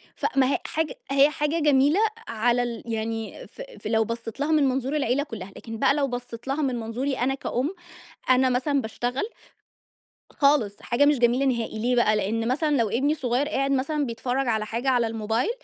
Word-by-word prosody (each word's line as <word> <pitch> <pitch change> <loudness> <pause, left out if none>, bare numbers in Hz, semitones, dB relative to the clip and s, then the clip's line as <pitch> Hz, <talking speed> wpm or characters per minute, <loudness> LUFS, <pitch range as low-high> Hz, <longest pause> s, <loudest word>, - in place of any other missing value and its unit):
ف - - -4
ما 260 -1 +5
هي - - 0
حاجة 320 +7 -2 0.2
هي 275 +1 +5
حاجة 300 +2 -1
جميلة 295 +3 +4 0.3
على 240 +2 +1
ال 235 -2 -5
يعني 225 -1 -4
ف - - -12 0.2
ف - - -6
لو 225 0 +2
بصّيت 230 +2 -6
لها 290 +2 0
من 305 -2 +4
منظور 265 +3 -1
العيلة 275 -1 +1
كُلّها، 205 -9 -8
لكن 225 -1 -7
بقى - - +4
لو 285 -1 +1
بصّيت 245 -1 -7
لها 280 +3 -1
من 260 -3 0
منظوري 245 +5 -2
أنا 265 +2 +1
كأُم، 275 +6 -2 0.5
أنا 255 0 +5
مثلًا 270 +3 +1
باشتغل 245 +3 -3 1.1
خالص، 280 -9 +2
حاجة 240 +4 +2
مش 290 -2 +3
جميلة 245 +3 +3
نهائي، 235 -4 -1
ليه 245 +3 +1
بقى؟ 215 -3 +3
لإن 220 +3 -1
مثلًا 290 +3 +1
لو 230 -3 +1
ابني 265 +8 +1
الصغير 265 -1 0
قاعد 275 0 0
مثلًا 280 +2 0
بيتفرّج 250 +2 -2
على 220 -2 0
حاجة 235 +5 -2
على 245 -3 +2
الموبايل 225 - -1
250 Hz, 190 wpm, -25 LUFS, 230-280 Hz, 1.1 s, ما